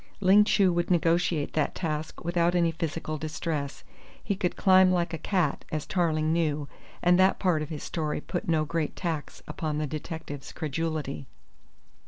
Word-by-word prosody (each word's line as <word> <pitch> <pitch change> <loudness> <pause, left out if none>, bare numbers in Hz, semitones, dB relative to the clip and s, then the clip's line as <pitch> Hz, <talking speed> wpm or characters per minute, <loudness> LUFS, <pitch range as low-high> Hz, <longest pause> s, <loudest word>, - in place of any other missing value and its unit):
Ling 200 +2 +6
Chu 195 -4 +3
would 170 0 0
negotiate 170 -3 +2
that 155 -2 0
task 155 -2 -4
without 175 0 +2
any 170 -2 +3
physical 160 -1 -4
distress. 155 -2 -4 0.4
He 200 - -1
could 180 -2 -1
climb 185 -1 +5
like 170 -2 0
a 165 - -3
cat, 180 -6 0
as 155 -1 -2
Tarling 160 -5 +1
knew, 150 -3 0 0.4
and 175 +1 +5
that 190 +1 +4
part 180 -5 +1
of 150 - -4
his 155 -3 -6
story 155 -3 -2
put 175 +3 -4
no 155 -2 +2
great 165 -1 -2
tax 165 -5 -4
upon 155 -2 -3
the 155 - 0
detective's 155 -1 -6
credulity. 155 -3 -3
165 Hz, 165 wpm, -27 LUFS, 155-175 Hz, 0.4 s, Ling